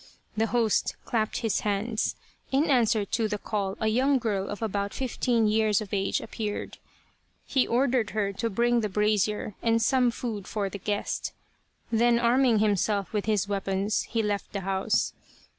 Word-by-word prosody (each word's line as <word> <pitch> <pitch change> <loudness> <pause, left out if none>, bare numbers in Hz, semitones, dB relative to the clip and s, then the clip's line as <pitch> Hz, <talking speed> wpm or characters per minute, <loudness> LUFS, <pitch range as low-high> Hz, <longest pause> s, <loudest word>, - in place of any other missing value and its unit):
The 220 +1 +1
host 230 -3 +1
clapped 220 -1 -1
his 225 -4 +1
hands. 215 +2 -1 0.4
In 285 +3 +2
answer 225 -5 +3
to 225 +2 0
the 210 -1 -2
call 200 -1 -3
a 220 - -1
young 260 +5 +3
girl 205 -5 -1
of 205 +2 -5
about 200 -1 -2
fifteen 245 -3 0
years 215 -1 +3
of 210 -1 -7
age 195 -1 +1
appeared. 215 -2 -5 0.7
He 265 -2 +1
ordered 245 -2 +2
her 205 -2 -1
to 230 +4 -2
bring 240 +3 +2
the 210 - -1
brazier 210 +1 +1
and 230 0 +2
some 250 +1 +3
food 225 -5 -5
for 205 -2 -2
the 200 - -6
guest. 205 +2 -2 0.6
Then 235 +1 +4
arming 240 0 +3
himself 205 -2 +1
with 210 -2 -1
his 210 -2 +1
weapons, 195 +1 0
he 230 -1 0
left 205 -1 -2
the 200 - -2
house. 190 0 0
215 Hz, 165 wpm, -27 LUFS, 205-235 Hz, 0.7 s, Then